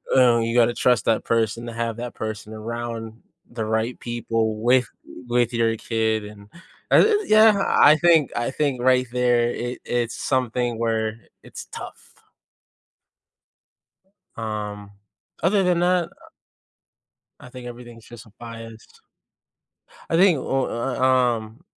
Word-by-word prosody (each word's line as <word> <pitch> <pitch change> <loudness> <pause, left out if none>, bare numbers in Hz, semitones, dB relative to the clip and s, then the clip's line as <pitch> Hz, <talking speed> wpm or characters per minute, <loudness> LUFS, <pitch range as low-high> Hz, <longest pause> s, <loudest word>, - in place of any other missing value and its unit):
uh, 120 -3 +5
you 115 +1 -1
gotta 120 0 +4
trust 125 -3 +1
that 110 -1 +1
person 115 0 -1
to 115 - -6
have 115 -1 -3
that 120 0 -6
person 110 -1 -6
around 115 0 -6 0.3
the 115 -2 -4
right 110 +2 -1
people 115 -2 -2
with, 125 +1 +3 0.4
with 120 0 +1
your 115 -1 +1
kid, 110 -2 -1
and 105 0 -13 0.4
I - - +6
th 430 -1 +3
yeah, 215 -2 +6
I 150 +2 +6
think 165 -4 +3
I 120 +2 -1
think 135 -4 -1
right 130 0 +3
there, 120 -1 +2
it 120 +1 -5
it's 120 -1 -2
something 125 -2 -1
where 110 -1 -1 0.2
it's - - -10
tough. - - -10 2.2
Um, 105 -2 -5 0.5
other 195 +3 +2
than 180 -1 +2
that, 175 -1 +2
uh - - -20 1.1
I - - -13
think 125 -1 -10
everything's 120 -1 -11
just 120 -1 -12
a 110 - -19
bias. 115 -1 -9 1.3
I 165 - +1
think, 180 -3 +5
ooh, 135 +1 -1
uh, 120 +3 -3
uh, - - -3
um 125 0 +1
120 Hz, 140 wpm, -23 LUFS, 115-130 Hz, 2.2 s, I